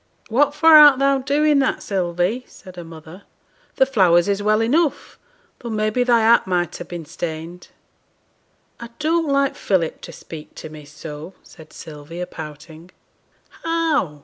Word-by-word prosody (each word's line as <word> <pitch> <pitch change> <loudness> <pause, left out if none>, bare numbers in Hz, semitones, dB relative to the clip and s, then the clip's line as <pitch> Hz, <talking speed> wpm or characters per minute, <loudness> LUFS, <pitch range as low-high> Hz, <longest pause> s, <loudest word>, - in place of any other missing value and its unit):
'What 285 +5 +2
for 320 +2 +5
art 295 -3 +8
thou 275 0 +2
doing 290 +2 +2
that, 270 - -1
Sylvie?' 185 +4 -1
said 185 -3 -15
her 175 - -8
mother. 165 +2 -12 0.5
'The 265 - +4
flowers 185 -9 +3
is 200 0 -1
well 215 +1 +2
enough, 290 +7 0 0.4
though 235 - -7
may 215 -1 -1
be 250 +3 +1
thy 240 -2 +3
hat 225 -2 +4
might 175 -2 -1
ha' - - -9
been 170 -2 -7
stained.' 165 +3 -7 1.1
'I 235 - -9
don't 325 +1 0
like 275 -1 +1
Philip 175 -5 -1
to - - -9
speak 155 -2 -11
to - - -9
me 155 -1 -12
so,' 150 +4 -10
said 155 -2 -16
Sylvia, 160 +3 -8
pouting. 160 0 -11 0.7
'How?' 320 - -1
195 Hz, 155 wpm, -20 LUFS, 165-270 Hz, 1.1 s, art